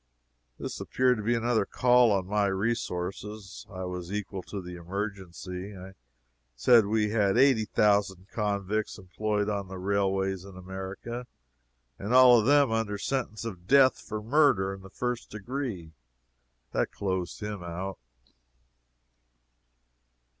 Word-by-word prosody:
This - - -5
appeared 125 -1 +2
to 105 - -5
be 120 +3 +2
another 115 -2 +1
call 125 +2 +4
on 95 -2 +1
my 105 +1 +1
resources. 100 -1 -3
I 95 -1 -5
was 90 0 -5
equal 100 -2 -4
to 100 - -7
the 90 -1 -8
emergency. 95 +1 -6
I 95 +1 -10 0.6
said 110 - +5
we 105 0 +1
had 105 -1 +2
eighty 130 -4 +5
thousand 100 -3 +2
convicts 105 0 -1
employed 105 +2 -2
on 100 -2 -2
the 95 0 -7
railways 95 -1 0
in 95 -1 -12
America 95 +6 -6 0.7
all 125 +3 +6
of 110 - 0
them 145 -3 +5
under 110 -2 -1
sentence 115 -1 -3
of 90 -5 -7
death 135 -1 +5
for 105 -1 -6
murder 120 -7 +3
in 95 - -10
the 95 - -12
first 125 +3 -3
degree. 105 - -5 0.8
That - - 0
closed 95 -3 -3
him 105 -2 -4
out. 90 +3 -5
100 Hz, 130 wpm, -28 LUFS, 95-115 Hz, 0.8 s, all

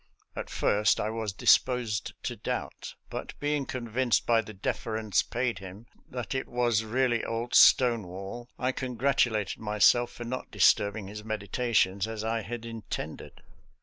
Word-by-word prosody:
At - - -5
first 105 +1 +2
I 110 - -1
was 110 -2 -3
disposed 115 +1 +2
to - - -3
doubt, - - -5 0.2
but - - -6
being 145 -1 -1
convinced 120 0 0
by 115 -1 +4
the 110 - -10
deference 110 0 -1
paid 120 0 -2
him 95 +3 -10 0.2
that 125 0 -4
it 130 - -2
was 120 -3 +1
really 120 +1 +1
old 115 +1 -3
Stonewall, 115 -1 +3
I 125 +1 0
congratulated 120 -5 0
myself 110 +3 +3
for 120 - -8
not 125 +2 -5
disturbing 100 0 +3
his 105 +1 -8
meditations 105 -2 0
as 110 -1 -5
I 115 0 -1
had 120 +1 -6
intended. 115 -2 -7
115 Hz, 145 wpm, -28 LUFS, 105-120 Hz, 0.2 s, by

